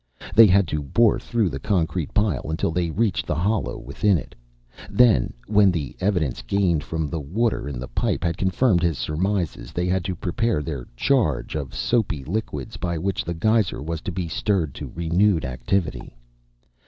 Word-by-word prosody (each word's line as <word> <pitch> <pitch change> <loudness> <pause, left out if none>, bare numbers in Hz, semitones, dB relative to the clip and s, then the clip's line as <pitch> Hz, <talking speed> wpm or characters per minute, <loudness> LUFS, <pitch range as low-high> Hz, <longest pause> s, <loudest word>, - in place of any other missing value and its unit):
They 115 -1 +9
had 95 -1 +4
to 75 - -1
bore 105 - +3
through 115 -5 0
the 65 - -4
concrete 85 -2 -1
pile 105 -7 0
until 80 +1 -1
they 85 0 0
reached 105 +4 0
the - - 0
hollow 100 +8 0
within 100 -3 +1
it. 75 - -8 0.6
Then, 120 - +4
when 105 -2 +4
the 75 -7 -4
evidence 90 -9 0
gained 90 -6 +1
from 80 -1 -3
the 80 +3 -3
water 90 - -1
in 70 - -5
the 65 +1 -6
pipe - - -1
had 85 -1 0
confirmed 95 +1 +2
his 85 -4 +1
surmises, 80 -1 -2
they 90 - -1
had 90 0 0
to 95 -1 -2
prepare 90 0 -1
their 70 -5 -5
"charge" 95 - +1
of 70 -4 -4
soapy 105 - 0
liquids 110 +6 -4
by 85 -2 -2
which 95 +4 -1
the 85 - -4
geyser 110 - +1
was 80 +1 -4
to - - -4
be 90 -1 -3
stirred 85 -3 0
to - - -7
renewed 85 0 +2
activity. 65 +2 -2
90 Hz, 180 wpm, -23 LUFS, 75-105 Hz, 0.6 s, They